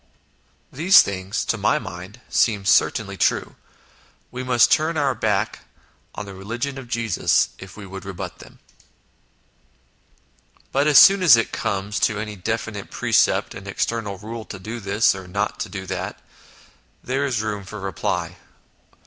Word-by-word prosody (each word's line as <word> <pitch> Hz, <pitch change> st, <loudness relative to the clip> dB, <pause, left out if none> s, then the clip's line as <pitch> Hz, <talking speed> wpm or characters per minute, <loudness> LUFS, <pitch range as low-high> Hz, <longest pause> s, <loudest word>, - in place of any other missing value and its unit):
These 175 Hz, +8 st, +6 dB
things, 95 Hz, 0 st, -3 dB
to -, -, -1 dB
my -, -, +2 dB
mind, 95 Hz, +7 st, -9 dB
seem 105 Hz, -4 st, +1 dB
certainly -, -, +2 dB
true; -, -, 0 dB, 0.8 s
we 125 Hz, -, -5 dB
must 125 Hz, -2 st, +3 dB
turn 160 Hz, +1 st, +2 dB
our 140 Hz, -3 st, +2 dB
back 105 Hz, -2 st, -1 dB, 0.6 s
on 105 Hz, -, -5 dB
the 100 Hz, -, -9 dB
religion 120 Hz, +8 st, -5 dB
of 130 Hz, -, -10 dB
Jesus 115 Hz, -5 st, +1 dB
if 95 Hz, +1 st, -11 dB
we 105 Hz, -, -9 dB
would 95 Hz, 0 st, -9 dB
rebut 95 Hz, -1 st, -7 dB
them. -, -, -14 dB, 2.1 s
But 140 Hz, +2 st, +2 dB
as 150 Hz, -3 st, +6 dB
soon 195 Hz, 0 st, +8 dB
as 160 Hz, -10 st, +8 dB
it 115 Hz, -, -1 dB
comes 100 Hz, +1 st, -2 dB
to 105 Hz, -, +1 dB
any 105 Hz, 0 st, -5 dB
definite 105 Hz, +1 st, -4 dB
precept -, -, +1 dB
and 100 Hz, +1 st, -10 dB
external 105 Hz, 0 st, -2 dB
rule 110 Hz, +3 st, -7 dB
to 100 Hz, -, -8 dB
do 110 Hz, +5 st, -7 dB
this, 100 Hz, +1 st, +2 dB
or 95 Hz, -2 st, -9 dB
not 100 Hz, +3 st, -2 dB
to -, -, -4 dB
do 95 Hz, 0 st, -6 dB
that -, -, -5 dB, 0.8 s
there 135 Hz, +2 st, -1 dB
is 120 Hz, -6 st, -1 dB
room 105 Hz, -2 st, -3 dB
for 105 Hz, +3 st, -9 dB
reply. 95 Hz, -2 st, -3 dB
105 Hz, 155 wpm, -22 LUFS, 95-120 Hz, 2.1 s, soon